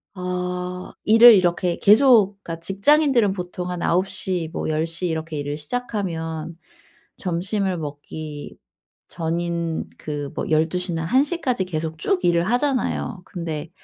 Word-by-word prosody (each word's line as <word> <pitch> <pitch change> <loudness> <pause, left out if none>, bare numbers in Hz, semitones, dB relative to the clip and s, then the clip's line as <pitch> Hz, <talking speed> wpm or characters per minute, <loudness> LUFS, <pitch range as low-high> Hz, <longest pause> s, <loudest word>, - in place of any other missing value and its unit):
어. 180 0 -4
일을 225 +2 +9
이렇게 175 -2 +2
계속 210 -3 +5
그러니까 165 -1 -6
직장인들은 230 - +3
보통 180 -1 -5
한 180 -1 -4
9:00, 180 -2 0
뭐 - - -3
10:00 165 +3 -1
이렇게 160 -1 -3
일을 145 0 -3
시작하면 165 -4 -4 0.6
점심을 185 +1 -1
먹기 150 0 -7 0.5
전인 170 0 -3
그 145 -2 -5
뭐 - - -2
12:00 170 +3 +1
나 165 0 -2
01:00 285 - +1
까지 250 -10 0
계속 160 -2 -4
쭉 185 +4 0
일을 170 -1 +3
하잖아요. 245 -6 -1
근데 165 -3 -5
180 Hz, 230 characters per minute, -22 LUFS, 160-200 Hz, 0.6 s, 일을